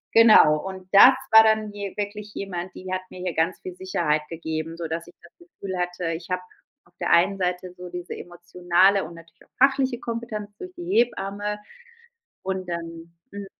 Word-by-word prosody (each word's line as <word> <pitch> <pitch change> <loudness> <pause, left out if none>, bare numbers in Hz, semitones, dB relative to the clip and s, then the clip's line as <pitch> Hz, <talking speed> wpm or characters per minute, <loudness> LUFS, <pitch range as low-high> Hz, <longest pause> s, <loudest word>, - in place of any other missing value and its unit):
Genau. 215 -9 +7
Und 190 -1 -8
das 245 +6 +9 0.2
war 220 0 +9
dann 220 -1 +2
hier 200 -2 -6
wirklich 205 0 -5
jemand, 180 -2 -5
die 185 0 -8
hat 185 - -1
mir - - -11
hier 180 -2 -2
ganz 165 +3 0
viel 370 -1 -8
Sicherheit 170 - 0
gegeben. 160 0 -5
Sodass 165 0 -4
ich 175 - -16
das 170 - -17
Gefühl 200 - -8
hatte, 175 -1 -2
ich 165 +2 -8
habe 180 - 0 0.4
auf 175 - -28
der - - -1
einen 190 +3 +4
Seite 180 0 -2
so 180 0 -8
diese 175 0 -6
emotionale 175 +2 +1
und 170 +1 -10
natürlich 165 0 -17
auch 270 - +4
fachliche 265 -3 -2
Kompetenz 225 -3 -5
durch 365 0 -8
die 350 - -8
Hebamme. 210 - 0 0.9
Und 190 -1 -4
dann 165 0 -7 0.2
hm 200 -1 -7
185 Hz, 180 wpm, -24 LUFS, 170-210 Hz, 0.9 s, das